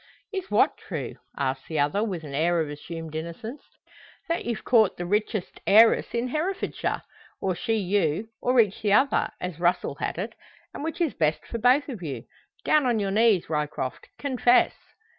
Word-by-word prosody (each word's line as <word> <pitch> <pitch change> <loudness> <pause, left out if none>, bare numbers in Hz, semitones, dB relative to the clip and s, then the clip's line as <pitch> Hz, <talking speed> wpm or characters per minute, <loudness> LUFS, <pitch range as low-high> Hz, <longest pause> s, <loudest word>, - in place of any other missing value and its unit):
"Is 385 -1 -4
what - - +3
true?" - - -6 0.2
asks 130 -1 -2
the 160 - -3
other, 145 +9 +2
with 185 -7 -3
an 145 -2 -8
air 170 +4 +2
of 155 -2 -1
assumed 160 +2 -7
innocence. 170 - -6 0.7
"That 335 - -1
you've 235 -1 -3
caught 220 -5 +4
the 175 - -4
richest 210 +1 -1
heiress 225 +3 +5
in 240 +2 0
Herefordshire, 345 +8 -2 0.4
or 190 - 0
she 225 +6 -1
you, 200 -1 0
or 250 0 +3
each 210 -4 +3
the 205 -2 +2
other, 270 +6 +3
as 180 -3 -5
Russel 175 +1 +1
had - - -2
it, - - -4 0.4
and - - -6
which 325 +2 -4
is 325 -5 +1
best 155 -1 0
for 230 - -5
both 250 +5 +4
of 240 -9 -6
you. 145 -6 -5 0.4
Down 300 -4 +4
on 240 -2 +2
your 200 -1 -1
knees, 215 -3 +3
Ryecroft! 150 -4 -3
Confess!" 250 -3 +3
205 Hz, 180 wpm, -26 LUFS, 165-245 Hz, 0.7 s, heiress